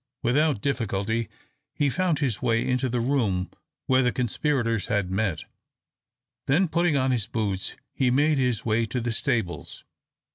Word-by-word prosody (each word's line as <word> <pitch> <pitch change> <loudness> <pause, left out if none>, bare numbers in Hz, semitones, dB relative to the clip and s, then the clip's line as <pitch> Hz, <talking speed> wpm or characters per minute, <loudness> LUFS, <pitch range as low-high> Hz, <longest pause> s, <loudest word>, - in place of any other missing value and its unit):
Without 135 -1 +2
difficulty 115 -4 -1 0.5
he 145 - +2
found 175 +3 +1
his 130 -8 -1
way 115 -2 +1
into 125 0 +1
the 120 +1 -1
room 115 -8 0 0.3
where 130 0 +4
the 125 -1 +2
conspirators 120 -2 0
had 100 -3 0
met; 95 -3 -1 1.0
then, 175 +8 +3
putting 170 -2 +2
on 130 0 +2
his 115 -4 0
boots, 105 -5 -2 0.2
he 130 - +2
made 145 +3 +3
his 125 -4 0
way 115 0 +1
to 125 - -2
the 120 0 -2
stables. 90 -8 -2
120 Hz, 150 wpm, -26 LUFS, 110-135 Hz, 1.0 s, where